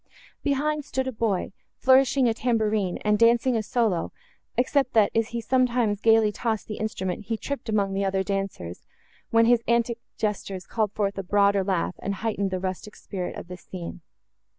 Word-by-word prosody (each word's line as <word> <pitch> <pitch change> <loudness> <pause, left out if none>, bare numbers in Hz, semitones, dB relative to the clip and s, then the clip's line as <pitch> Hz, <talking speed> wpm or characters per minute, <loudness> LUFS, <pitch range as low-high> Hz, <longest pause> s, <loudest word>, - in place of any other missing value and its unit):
Behind, 295 +2 0
stood 265 -2 -2
a - - -1
boy, 220 -5 -1 0.3
flourishing 260 0 +4
a 230 - +2
tamborine, 220 -5 0
and 210 0 +3
dancing 235 +2 +4
a 225 - +1
solo, 215 -6 0 0.5
except 260 +1 +2
that, 215 -3 +4
as 225 -1 +1
he 235 - -4
sometimes 240 -3 +1
gaily 225 -1 +5
tossed 220 0 -2
the 215 - -6
instrument, 195 -3 -3
he 225 +1 -2
tripped 280 -1 -5
among 200 -2 +1
the 195 +1 0
other 190 0 0
dancers, 195 - -4 0.4
when 230 0 +4
his 240 0 +4
antic 235 0 +1 0.2
gestures 200 -3 -3
called 215 -3 -1
forth 200 -1 -1
a - - -3
broader 200 +1 +3
laugh, 185 -2 0
and 200 - -3
heightened 200 -1 -1
the 185 -1 -2
rustic 190 +3 -5
spirit 185 -3 -5
of - - -8
the 180 0 -8
scene. 180 -1 -8
215 Hz, 175 wpm, -25 LUFS, 195-235 Hz, 0.5 s, gaily